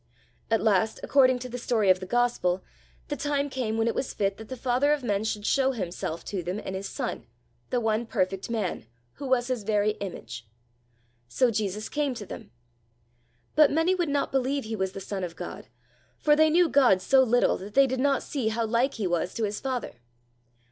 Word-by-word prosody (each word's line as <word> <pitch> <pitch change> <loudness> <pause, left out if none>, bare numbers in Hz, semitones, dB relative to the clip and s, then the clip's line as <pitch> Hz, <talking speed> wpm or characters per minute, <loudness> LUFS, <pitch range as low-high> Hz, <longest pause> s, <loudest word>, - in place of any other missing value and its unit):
At 225 -1 +2
last, 220 0 +2
according 260 -2 +4
to - - -3
the 250 0 -6
story 220 -5 +3
of 185 - +2
the 185 - -7
gospel, 195 -5 +1 0.5
the - - -1
time 285 -1 -1
came 230 -4 -2
when 225 0 +1
it 230 - +1
was 265 - -3
fit 195 -1 0
that 220 -1 -11
the 260 - -5
Father 255 +4 +2
of 295 -3 -2
men 205 -3 0
should 210 -1 -3
show 270 +2 +2
himself 175 -6 -4
to 195 -3 -3
them 180 +3 -3
in 190 - -5
his 190 +1 -4
son, - - -4 0.4
the 250 - +1
one 225 0 0
perfect 190 -1 -1
man, 210 - -2 0.3
who 280 - -5
was 255 -2 +2
his 250 -3 -1
very 210 0 +1
image. 115 - -7 0.8
So 240 - +2
Jesus 210 -1 -2
came 290 -3 -1
to 210 - -7
them. 180 - -9 1.1
But 300 -2 +7
many 325 +5 +2
would 350 -4 0
not 285 0 0
believe 270 +1 0
he 220 0 -4
was 190 -2 -2
the - - -6
son 195 0 -5
of 170 -2 -5
God, - - -8 0.5
for 295 -1 +4
they 315 +1 +5
knew 345 +2 +4
God 260 -10 +4
so 265 +8 +4
little 245 -1 +3
that 200 +2 -9
they 275 0 +7
did 260 -1 -2
not 275 0 +2
see 265 -7 -2
how 225 +1 0
like 235 +5 +1
he 215 - -3
was 175 0 -1
to 230 - -2
his 210 0 -2
Father. 255 - -4
230 Hz, 210 wpm, -27 LUFS, 200-265 Hz, 1.1 s, But